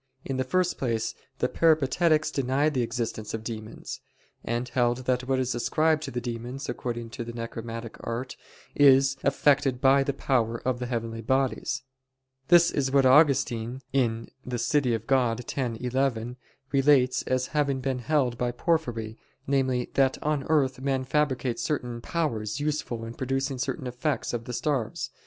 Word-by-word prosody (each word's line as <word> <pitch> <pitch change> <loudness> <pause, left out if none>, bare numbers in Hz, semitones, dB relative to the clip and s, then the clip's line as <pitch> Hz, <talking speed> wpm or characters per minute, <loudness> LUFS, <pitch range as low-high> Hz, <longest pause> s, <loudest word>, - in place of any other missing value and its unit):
In 135 - -2
the 130 - +1
first 180 +7 0
place 115 -4 -1 0.2
the - - +1
Peripatetics 155 0 +3
denied 140 +3 +1
the 130 - +1
existence 115 -2 -3
of 110 - -6
demons; 110 -1 -7 0.4
and 120 +2 -2
held 120 0 0
that 125 0 0
what 135 0 +2
is 130 -1 0
ascribed 155 +6 +1
to - - -5
the 120 - -3
demons, 120 +3 -5
according 120 -1 -4
to 120 0 -5
the 120 - -6
necromantic 115 0 -6
art, 120 +3 -4 0.4
is 135 -1 +5
effected 140 -2 +2
by 135 +1 +5
the 135 - 0
power 115 -4 0
of 125 -1 0
the 125 - -3
heavenly 115 -2 -3
bodies. 130 +2 0 0.6
This 175 0 +6
is 135 -2 0
what 135 0 +4
Augustine 130 -3 +3
(De 125 0 -2
Civ. 145 +5 +2
Dei 125 -4 +1
x, 125 -3 +1
11) 125 -1 -1 0.3
relates 135 -2 +4
as 130 0 +1
having 140 -3 +1
been 130 -1 -2
held 125 -3 0
by 125 - +1
Porphyry, 120 -6 -1 0.3
namely, 130 -2 0
that 135 -1 +3
"on 150 -3 0
earth 135 -4 +2
men 135 -1 0
fabricate 130 -3 0
certain 125 -6 -2
powers 115 -9 -2
useful 145 -6 -2
in 115 - -7
producing 135 +1 -2
certain 135 0 -3
effects 125 +4 -2
of 115 -1 -3
the 125 - -5
stars." 135 -4 -2
130 Hz, 155 wpm, -27 LUFS, 120-140 Hz, 0.6 s, This